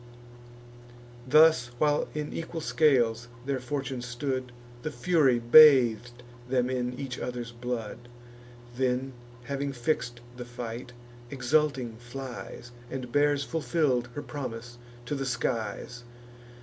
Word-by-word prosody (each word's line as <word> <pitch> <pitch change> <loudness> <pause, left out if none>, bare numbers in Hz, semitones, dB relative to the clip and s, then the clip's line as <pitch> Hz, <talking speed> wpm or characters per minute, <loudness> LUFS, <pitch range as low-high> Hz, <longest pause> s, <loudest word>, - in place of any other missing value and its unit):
Thus, 155 -2 +6
while 150 +2 +2
in 150 -1 -3
equal 165 0 -5
scales 120 -8 +2 0.2
their 135 -1 -1
fortune 130 0 -4
stood 125 +1 -3 0.3
The 155 - -3
Fury 155 -8 +3
bath'd 120 -2 +6 0.3
them 125 -1 +1
in 125 0 -2
each 135 -3 -5
other's 120 -1 -5
blood; 120 -1 -5 0.7
Then, 130 +1 0 0.3
having 140 +1 -3
fix'd 120 -2 -2 0.2
the 125 - -6
fight, 120 0 -7 0.4
exulting 135 -3 0
flies, 120 -1 -8 0.2
And 130 -2 -6
bears 145 0 +3
fulfill'd 135 -3 0
her 145 - -4
promise 120 -3 -7 0.3
to 135 - -4
the 135 -1 -2
skies. 120 0 -3
125 Hz, 110 wpm, -28 LUFS, 120-140 Hz, 0.7 s, Thus